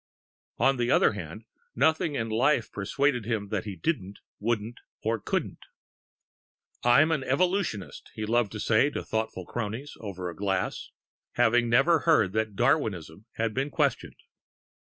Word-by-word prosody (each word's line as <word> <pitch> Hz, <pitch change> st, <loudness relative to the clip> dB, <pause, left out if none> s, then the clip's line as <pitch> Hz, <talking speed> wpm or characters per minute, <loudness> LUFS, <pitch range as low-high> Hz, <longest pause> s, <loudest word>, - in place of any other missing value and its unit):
On 135 Hz, 0 st, +3 dB
the 120 Hz, 0 st, 0 dB
other -, -, +4 dB
hand, 105 Hz, +2 st, -8 dB, 0.3 s
nothing 160 Hz, +3 st, +2 dB
in 115 Hz, -4 st, -1 dB
life 120 Hz, +3 st, +1 dB
persuaded 125 Hz, +4 st, 0 dB
him 105 Hz, -3 st, -2 dB
that 105 Hz, -1 st, -2 dB
he 100 Hz, -3 st, -5 dB
didn't, 100 Hz, -, -2 dB, 0.2 s
wouldn't, 115 Hz, +1 st, -2 dB, 0.5 s
couldn't. -, -, -2 dB, 1.2 s
"I'm 140 Hz, +7 st, +5 dB
an 150 Hz, -5 st, 0 dB
Evolutionist," 155 Hz, -, -1 dB
he 110 Hz, -, -3 dB
loved 115 Hz, -1 st, +1 dB
to 105 Hz, -, -5 dB
say 115 Hz, +7 st, +3 dB
to -, -, -5 dB
thoughtful 110 Hz, -5 st, -3 dB
cronies 120 Hz, +7 st, -5 dB
(over 95 Hz, -4 st, -6 dB
a 85 Hz, -, -6 dB
glass), 95 Hz, -2 st, -2 dB, 0.4 s
having 120 Hz, 0 st, +3 dB
never 140 Hz, +8 st, +4 dB
heard 110 Hz, -, +3 dB
that 110 Hz, -1 st, -1 dB
Darwinism 110 Hz, -, 0 dB
had 115 Hz, -1 st, -1 dB
been 135 Hz, +4 st, -1 dB
questioned.... -, -, -1 dB
115 Hz, 140 wpm, -27 LUFS, 105-135 Hz, 1.2 s, I'm